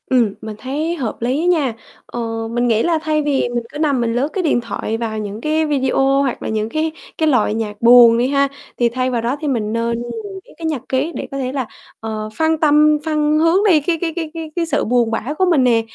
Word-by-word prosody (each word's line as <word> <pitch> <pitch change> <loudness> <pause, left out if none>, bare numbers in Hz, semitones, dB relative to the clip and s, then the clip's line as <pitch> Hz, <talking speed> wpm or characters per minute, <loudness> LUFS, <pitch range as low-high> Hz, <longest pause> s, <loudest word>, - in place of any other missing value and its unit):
Ừm, 240 -6 +2
mình 220 -1 -6
thấy 300 +6 -2
hợp 250 -9 -3
lý 260 +8 0
nha, 305 -9 +2 0.3
ờ, 225 -1 -4
mình 240 +1 0
nghĩ 225 -1 +2
là 340 -1 +2
thay 310 -1 0
vì 285 -4 0
mình 240 -1 -2
cứ - - -6
nằm 285 -5 +1
mình 230 -1 0
lướt, 260 +4 +1
cái, 380 - -1
điện 290 -7 +2
thoại 225 -1 -4
vào 225 -2 -3
những 210 0 -5
cái 310 +2 +1
video 270 -1 +2
hoặc 270 -3 -2
là - - -3
những 215 0 -1
cái 315 +4 -1 0.3
cái 315 - +1
loại 245 -7 +2
nhạc 215 -2 -4
buồn 235 -1 +8
đi 245 +2 +2
ha, 280 0 +2 0.3
thì 240 -1 +2
thay 255 +2 -1
vào 240 -2 -1
đó 240 +4 -1
thì 305 - -2
mình 220 -6 -1
nên 230 0 -1
mình 390 - -6
viết - - -18
cái 330 - -6
nhật 305 -6 -1
ký 270 +5 0
để - - -5
có 275 - -4
thể 255 -2 -2
là, 265 -3 -3 0.3
ờ, 215 -1 -5
phân 320 0 +2
tâm 300 0 +4
phân 305 -1 +1
hướng 330 +3 +4
đi, 325 -5 +5
cái 330 +3 0
cái 330 -2 -1
cái 325 -3 -4
cái 325 -2 -6
cái 345 -2 0
sự 305 -3 0
buồn 240 -1 +2
bã 230 +5 -2
của 375 - +3
mình 305 -7 +4
nè, 235 -2 +3
265 Hz, 250 wpm, -18 LUFS, 230-310 Hz, 0.3 s, buồn